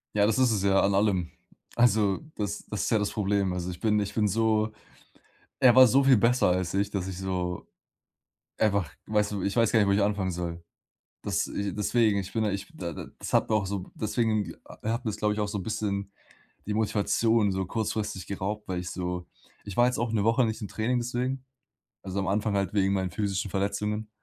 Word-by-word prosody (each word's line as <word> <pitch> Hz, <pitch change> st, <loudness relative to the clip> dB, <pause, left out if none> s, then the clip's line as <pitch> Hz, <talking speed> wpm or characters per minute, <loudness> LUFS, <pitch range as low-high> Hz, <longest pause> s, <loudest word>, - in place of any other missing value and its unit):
Ja, 100 Hz, -1 st, +4 dB
das 110 Hz, +3 st, +1 dB
ist 130 Hz, -2 st, +4 dB
es 105 Hz, -3 st, 0 dB
ja, 95 Hz, -1 st, +4 dB
an 100 Hz, -, +2 dB
allem. 95 Hz, -4 st, +1 dB, 0.4 s
Also, 110 Hz, -5 st, +3 dB, 0.2 s
das 105 Hz, -1 st, -4 dB
das 105 Hz, -, -2 dB
ist -, -, 0 dB
ja 110 Hz, -, +4 dB
das 105 Hz, 0 st, -1 dB
Problem. 100 Hz, -2 st, 0 dB
Also, 90 Hz, 0 st, -3 dB
ich 90 Hz, -1 st, -7 dB
bin 105 Hz, 0 st, +2 dB
ich 100 Hz, 0 st, -2 dB
bin 105 Hz, -1 st, +2 dB
so 110 Hz, +1 st, +1 dB, 0.9 s
er 125 Hz, -2 st, +7 dB
war 130 Hz, 0 st, +9 dB
so 135 Hz, +4 st, +4 dB
viel 135 Hz, -2 st, +6 dB
besser 115 Hz, +2 st, +3 dB
als 90 Hz, 0 st, 0 dB
ich, 100 Hz, +1 st, +1 dB
dass 100 Hz, -3 st, -2 dB
ich 95 Hz, -, -5 dB
so 90 Hz, -2 st, -3 dB, 0.9 s
einfach 100 Hz, -6 st, +1 dB, 0.2 s
weißt 105 Hz, -1 st, +1 dB
du, 100 Hz, -, -3 dB
ich 100 Hz, -, -1 dB
weiß 115 Hz, -2 st, +3 dB
gar 115 Hz, -, +4 dB
nicht, 100 Hz, -, +3 dB
wo -, -, +3 dB
ich 100 Hz, +1 st, +3 dB
anfangen 100 Hz, -2 st, 0 dB
soll. 85 Hz, -1 st, -5 dB, 0.6 s
Das -, -, -1 dB
i 100 Hz, -1 st, -3 dB
deswegen, 105 Hz, 0 st, +2 dB
ich 95 Hz, -1 st, -6 dB
bin 110 Hz, -, +1 dB
da 105 Hz, -, +1 dB
ich 100 Hz, 0 st, -5 dB
da 85 Hz, -2 st, -5 dB
da -, -, -7 dB
das -, -, -6 dB
habe -, -, +3 dB
auch 105 Hz, -2 st, +2 dB
so 95 Hz, -1 st, -4 dB
deswegen 110 Hz, -1 st, 0 dB
a -, -, -13 dB
hat 115 Hz, +2 st, -1 dB
mir -, -, +1 dB
es, 105 Hz, -, -6 dB
glaube 105 Hz, -1 st, +1 dB
ich, 105 Hz, -, -4 dB
auch 105 Hz, -, 0 dB
so 100 Hz, -, -3 dB
'n 95 Hz, -, -4 dB
bisschen 100 Hz, -2 st, -2 dB, 0.5 s
die 105 Hz, -, -2 dB
Motivation 110 Hz, 0 st, +2 dB
so 95 Hz, 0 st, -1 dB
kurzfristig 105 Hz, -2 st, -3 dB
geraubt, 100 Hz, +2 st, -4 dB
weil 90 Hz, -1 st, -2 dB
ich 90 Hz, 0 st, -5 dB
so 90 Hz, -1 st, -4 dB, 0.4 s
ich 100 Hz, -, -7 dB
war 120 Hz, -, +6 dB
jetzt 125 Hz, 0 st, +1 dB
auch 120 Hz, -1 st, -1 dB
1 110 Hz, -3 st, +1 dB
Woche 115 Hz, +3 st, +3 dB
nicht 110 Hz, +1 st, -3 dB
im 105 Hz, -, -4 dB
Training 120 Hz, +5 st, -1 dB
deswegen, 125 Hz, +2 st, -2 dB, 0.6 s
also, 95 Hz, 0 st, -3 dB
am 95 Hz, -, -2 dB
Anfang 105 Hz, +1 st, 0 dB
halt 100 Hz, -1 st, 0 dB
wegen 100 Hz, -1 st, +2 dB
meinen 95 Hz, -2 st, -1 dB
physischen 100 Hz, 0 st, -2 dB
Verletzungen, 105 Hz, +2 st, -2 dB
105 Hz, 225 wpm, -27 LUFS, 95-110 Hz, 0.9 s, war